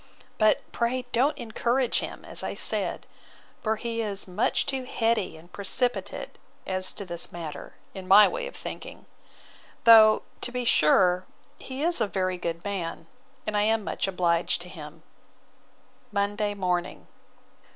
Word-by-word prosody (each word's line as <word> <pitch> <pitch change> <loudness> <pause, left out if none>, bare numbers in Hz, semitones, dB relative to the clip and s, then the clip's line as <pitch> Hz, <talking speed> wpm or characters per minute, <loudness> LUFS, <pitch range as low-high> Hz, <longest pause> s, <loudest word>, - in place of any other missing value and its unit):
But 215 -1 +4
pray 250 +2 -1
don't 265 +6 +2
encourage 240 +2 +1
him, - - -7
as - - -3
I - - -4
said; - - -2 0.6
for 220 -1 0
he 230 +1 -3
is 200 -3 -3
much 185 +5 +1
too 265 -1 -2
heady 225 -8 0
and 170 +3 -17
precipitate 245 +5 -1 0.3
as 185 0 -1
to 200 - -6
this 170 -2 -2
matter, 165 -3 -8 0.2
in 190 -2 -8
my 205 +2 +8
way - - -3
of - - -10
thinking; - - -8 0.8
though, 220 -2 +8 0.2
to 245 - 0
be 250 0 -3
sure, 180 0 +4 0.3
he 265 +2 -6
is 340 -6 +2
a 220 - +2
very 185 -1 -2
good 170 0 -4
man, 170 -5 -4 0.4
and 215 - -2
I 205 - +3
am 220 +1 +2
much - - -2
obliged 175 -2 +1
to 180 - -12
him. 150 -3 -11 1.1
Monday 205 0 -1
morning. 180 -2 -2
205 Hz, 150 wpm, -26 LUFS, 180-235 Hz, 1.1 s, my